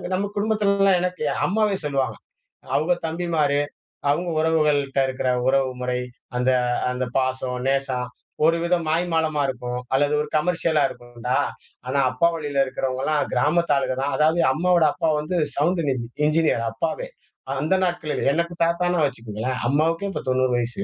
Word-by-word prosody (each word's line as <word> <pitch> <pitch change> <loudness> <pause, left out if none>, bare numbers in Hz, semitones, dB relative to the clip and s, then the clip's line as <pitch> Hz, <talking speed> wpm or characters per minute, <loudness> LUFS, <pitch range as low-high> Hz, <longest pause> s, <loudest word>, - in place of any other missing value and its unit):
நம்ம 200 +2 -2
குடும்பத்திலல்லாம் 200 -3 +3
எனக்கு 180 -3 -2 0.2
அம்மாவே 210 0 +1
சொல்லுவாங்க. 140 -2 -1 0.6
அவங்க 165 +4 +2
தம்பிமாரு, 160 -4 0 0.5
அவங்க 170 +5 +1
உறவுகள்ட்ட 150 -4 +2
இருக்கிற 130 0 -2 0.2
உறவு 135 0 +3
முறை, 125 0 -1 0.4
அந்த 125 +1 +2 0.4
அந்த 125 0 -2
பாசம், 130 -1 -1
நேசம், 135 -2 0 0.4
ஒரு 165 +1 +4
வித 170 +1 +2
மாய்மாலமா 160 -2 +1
இருக்கும். 125 -1 -4 0.2
அல்லது 145 +2 +2
ஒரு 150 - -4
கமர்ஷியலா 165 -1 +1
இருக்கும்டா. 120 +1 -4 0.5
ஆனா, 135 +2 0
அப்பா 130 +7 +3
வழியில 145 -3 0
இருக்கிறவங்கல்லாம் 135 +3 -1
கிராமத்து 170 +1 +2
ஆளுக 135 -2 0
தான். 140 +1 -1
அதாவது 155 +3 +3
அம்மாவோட 175 +2 +3
அப்பா 165 -2 0
வந்து 165 +4 -2 0.2
சவுண்டின் 160 -1 +1
இஞ் 120 -2 -4 0.2
என்ஜினியர் 155 -7 +2
அப்பாவே. 160 - -3 0.5
அந்த 160 +6 +2
நாட்களிலே. 175 -4 -2
எனக்கு 170 +2 -1
தாத்தான்னா 170 0 +1
வச்சுக்கங்களேன். 120 -1 -4
அம்மாவுக்கும் 165 +7 +1
இப்ப - - -4
90 130 0 +2
வயசு. 120 +11 -2
150 Hz, 140 wpm, -23 LUFS, 130-170 Hz, 0.6 s, ஒரு